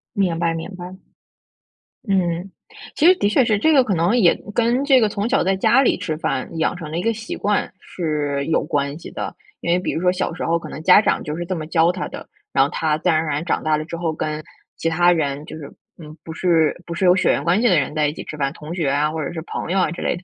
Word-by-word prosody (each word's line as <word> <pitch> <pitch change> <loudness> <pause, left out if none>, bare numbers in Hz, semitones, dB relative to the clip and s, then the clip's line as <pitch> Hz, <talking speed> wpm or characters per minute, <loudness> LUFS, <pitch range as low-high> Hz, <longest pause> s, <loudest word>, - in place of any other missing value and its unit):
明 180 -4 +1
白， 170 -1 +1
明 165 +2 -5
白。 175 -1 -8 1.2
嗯， 180 -1 0 0.4
其 310 - +2
实 370 - +7
的 205 - +1
确 240 +4 +3
是， 220 -3 +2
这 315 +10 +3
个 275 -4 +5
可 205 -6 -1
能 175 +8 +2
也 185 -8 +5 0.2
跟， 240 +4 +1
这 270 -3 +5
个 220 - +3
从 205 +2 -2
小 270 - +2
在 190 +1 +1
家 235 +7 +4
里 275 - +2
吃 155 -3 -3
饭 160 +1 -3
养 160 - 0
成 165 -4 -8
了 160 - -3
一 - - -1
个 230 +4 +1
习 220 +1 -6
惯 205 -1 -1
是 150 -6 -2
有 165 - +1
关 140 0 -2
系 - - -9
的。 - - -5 0.3
因 170 - -1
为 175 - +3
比 180 - -2
如 160 - -2
说 180 0 +3
小 185 +1 -2
的 165 - -7
时 - - -5
候 170 0 +1
可 160 - -9
能 155 +1 -8
家 185 +4 +7
长 - - 0
就 150 +2 -4
是 175 - -4
这 185 +1 -3
么 160 -2 -5
教 165 +1 +3
他 180 0 -4
的， - - -9 0.2
然 135 - +4
后 - - -3
他 155 -2 0
自 - - 0
然 155 - +3
而 160 - -2
然 150 +2 -2
长 - - -1
大 155 -1 +2
了 155 - -4
之 170 - -6
后， 165 -1 -2
跟 155 0 -4 0.3
其 165 - -1
他 175 +2 +4
人 145 -3 -2
就 - - -9
是， 145 -3 -9 0.3
嗯， 155 -1 -12
不 160 - -7
是， 165 -3 +2
不 170 - -5
是 185 +3 -1
有 180 0 +6
血 185 - +2
缘 - - +1
关 180 +5 +3
系 240 - +4
的 180 -5 +4
人 145 - -3
在 150 -1 +2
一 - - -5
起 - - -8
吃 - - -7
饭， 140 -2 -1
同 155 +4 -8
学 160 -6 0
啊， 145 +2 +1
或 160 -1 -3
者 - - -4
是 165 - -5
朋 170 - -5
友 195 - +2
啊 - - +1
之 175 - -6
类 - - -1
的， 175 - -13
170 Hz, 310 characters per minute, -21 LUFS, 155-190 Hz, 1.2 s, 实